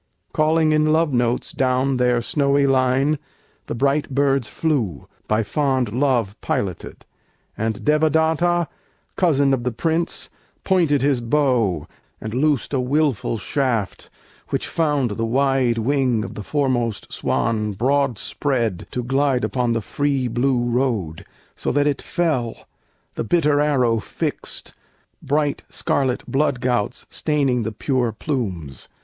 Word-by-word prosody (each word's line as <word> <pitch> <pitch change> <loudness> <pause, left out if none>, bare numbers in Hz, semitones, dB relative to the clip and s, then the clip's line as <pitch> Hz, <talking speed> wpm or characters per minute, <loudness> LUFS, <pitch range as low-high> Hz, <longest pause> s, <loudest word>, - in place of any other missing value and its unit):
Calling 155 0 +3
in 155 0 +3
love 160 -2 +2
notes 120 0 0
down 130 +1 +1
their 125 -1 +2
snowy 140 +1 +2
line 135 +2 +2 0.5
The - - -3
bright 140 +4 +1
birds 135 -2 +1
flew, 125 - -1 0.2
by 110 +1 +2
fond 130 -1 0
love 120 -6 +1
piloted; 95 -4 -3 0.5
And 110 -1 -3
Devadatta, 160 +3 +2 0.5
cousin 145 -6 +3
of 125 -3 0
the 125 - 0
Prince, 165 +8 -2 0.3
Pointed 165 -8 +2
his 140 -3 +2
bow, 115 - +1 0.3
and 110 0 -6
loosed 145 0 +1
a 135 - +2
willful 130 -4 0
shaft 115 -3 -2 0.4
Which - - -1
found 145 -7 0
the 115 +3 -2
wide 130 -1 +2
wing 125 -2 +1
of - - -6
the - - -6
foremost 120 -6 -1
swan 110 -3 0
Broad 135 +3 +1
spread 115 -11 -2
to 125 - -3
glide 135 0 +1
upon 125 -2 0
the 115 - -1
free 140 +2 -1
blue 120 +1 +1
road, 115 - -1 0.3
So - - -2
that 145 0 +2
it 145 -2 0
fell, 140 -10 -2 0.5
the - - -3
bitter 150 +2 +2
arrow 130 -6 +2
fixed, - - -5 0.5
Bright 145 0 0
scarlet 130 -3 0
blood 140 -2 0
gouts 120 -4 -1
staining 140 -5 +1
the 110 0 -2
pure 125 +1 0
plumes. 95 - -4
130 Hz, 130 wpm, -21 LUFS, 115-145 Hz, 0.5 s, Calling